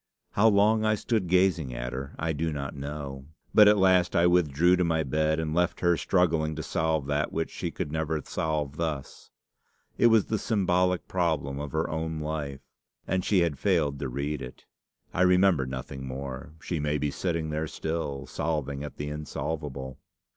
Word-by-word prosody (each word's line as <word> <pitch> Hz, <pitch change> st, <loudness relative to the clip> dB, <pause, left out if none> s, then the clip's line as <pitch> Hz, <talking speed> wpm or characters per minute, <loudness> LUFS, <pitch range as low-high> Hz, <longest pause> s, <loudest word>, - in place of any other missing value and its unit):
How 105 Hz, +3 st, +4 dB
long 110 Hz, +1 st, +4 dB
I 110 Hz, 0 st, +3 dB
stood 110 Hz, -3 st, -1 dB
gazing 85 Hz, -7 st, +2 dB
at -, -, -4 dB
her 70 Hz, +3 st, -6 dB
I 80 Hz, 0 st, -1 dB
do 80 Hz, +2 st, -1 dB
not 70 Hz, -1 st, -4 dB
know, 70 Hz, -1 st, -6 dB, 0.3 s
but 105 Hz, -1 st, +8 dB
at 105 Hz, 0 st, +6 dB
last 95 Hz, -2 st, +4 dB
I 85 Hz, -, +4 dB
withdrew 90 Hz, 0 st, +4 dB
to 90 Hz, -, +2 dB
my 80 Hz, -2 st, +1 dB
bed, 80 Hz, +3 st, +1 dB
and 80 Hz, -1 st, -2 dB
left 90 Hz, +1 st, +1 dB
her 85 Hz, -1 st, +4 dB
struggling 80 Hz, -4 st, +1 dB
to 80 Hz, -, -4 dB
solve 80 Hz, -4 st, 0 dB
that 70 Hz, +2 st, 0 dB
which 80 Hz, 0 st, -2 dB
she -, -, -3 dB
could 75 Hz, -, -4 dB
never 80 Hz, 0 st, -1 dB
solve 75 Hz, -2 st, -2 dB
thus. 80 Hz, -5 st, -4 dB, 0.7 s
It -, -, +6 dB
was 110 Hz, -3 st, +5 dB
the 110 Hz, -, -1 dB
symbolic 90 Hz, -4 st, +1 dB
problem 80 Hz, -7 st, -1 dB
of 75 Hz, -1 st, -5 dB
her 80 Hz, +1 st, 0 dB
own 80 Hz, 0 st, -3 dB
life, 75 Hz, -3 st, -4 dB, 0.5 s
and 95 Hz, -1 st, 0 dB
she 95 Hz, -2 st, +3 dB
had 80 Hz, -5 st, 0 dB
failed 80 Hz, -8 st, +1 dB
to -, -, -3 dB
read 70 Hz, +3 st, -3 dB
it. 65 Hz, 0 st, -9 dB, 0.5 s
I 90 Hz, -, 0 dB
remember 90 Hz, -6 st, +4 dB
nothing 65 Hz, +1 st, -6 dB
more. 65 Hz, +3 st, -6 dB
She 85 Hz, -1 st, -3 dB
may 75 Hz, 0 st, 0 dB
be 75 Hz, 0 st, -1 dB
sitting 80 Hz, -2 st, -2 dB
there 75 Hz, +1 st, -2 dB
still, 75 Hz, -4 st, -3 dB
solving 75 Hz, -3 st, -2 dB
at 75 Hz, -, -7 dB
the 75 Hz, 0 st, -4 dB
insolvable. 75 Hz, -3 st, -5 dB
80 Hz, 185 wpm, -27 LUFS, 70-90 Hz, 0.7 s, but